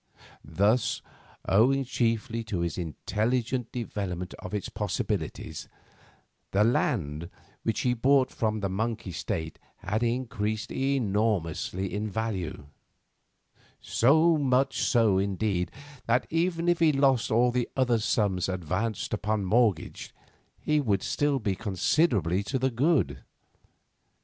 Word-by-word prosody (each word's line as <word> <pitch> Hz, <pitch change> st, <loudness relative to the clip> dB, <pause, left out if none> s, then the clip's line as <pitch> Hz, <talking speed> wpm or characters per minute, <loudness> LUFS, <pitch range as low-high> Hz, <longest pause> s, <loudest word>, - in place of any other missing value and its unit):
Thus, 100 Hz, -, +1 dB, 0.4 s
owing 130 Hz, +8 st, +4 dB
chiefly 115 Hz, -2 st, -1 dB
to 95 Hz, -5 st, -2 dB
his 85 Hz, -1 st, -1 dB
intelligent 115 Hz, -, -2 dB
development 95 Hz, -7 st, -4 dB
of -, -, -8 dB
its 105 Hz, -3 st, -3 dB
possibilities, -, -, -3 dB, 0.8 s
the 100 Hz, +2 st, +3 dB
land 85 Hz, -8 st, 0 dB, 0.3 s
which 110 Hz, -, -1 dB
he 125 Hz, -, +2 dB
bought 130 Hz, +2 st, +3 dB
from 110 Hz, -1 st, -1 dB
the 100 Hz, -, 0 dB
Monk 110 Hz, +4 st, -2 dB
estate 85 Hz, -3 st, -4 dB, 0.2 s
had 105 Hz, +4 st, -2 dB
increased 115 Hz, -3 st, -2 dB
enormously 105 Hz, -, 0 dB
in 105 Hz, +1 st, -2 dB
value; 100 Hz, -9 st, -3 dB, 1.1 s
so 155 Hz, +6 st, +4 dB
much 135 Hz, -2 st, +1 dB
so, 110 Hz, -6 st, +3 dB
indeed, 100 Hz, -2 st, -1 dB, 0.4 s
that, 120 Hz, +2 st, +2 dB
even 170 Hz, +1 st, 0 dB
if 175 Hz, -1 st, +3 dB
he 165 Hz, -2 st, +5 dB
lost 135 Hz, -4 st, +2 dB
all 120 Hz, +2 st, +3 dB
the 125 Hz, -1 st, -1 dB
other 120 Hz, -3 st, +3 dB
sums 100 Hz, -4 st, 0 dB
advanced 95 Hz, +6 st, -2 dB
upon 105 Hz, -1 st, -1 dB
mortgage, 105 Hz, -3 st, +1 dB, 0.4 s
he 150 Hz, 0 st, +1 dB
would 100 Hz, -8 st, 0 dB
still 145 Hz, -1 st, +1 dB
be 105 Hz, -6 st, -1 dB
considerably 100 Hz, -, +1 dB
to 105 Hz, +6 st, -2 dB
the 130 Hz, +1 st, 0 dB
good. 120 Hz, -, +1 dB
110 Hz, 120 wpm, -28 LUFS, 95-125 Hz, 1.1 s, he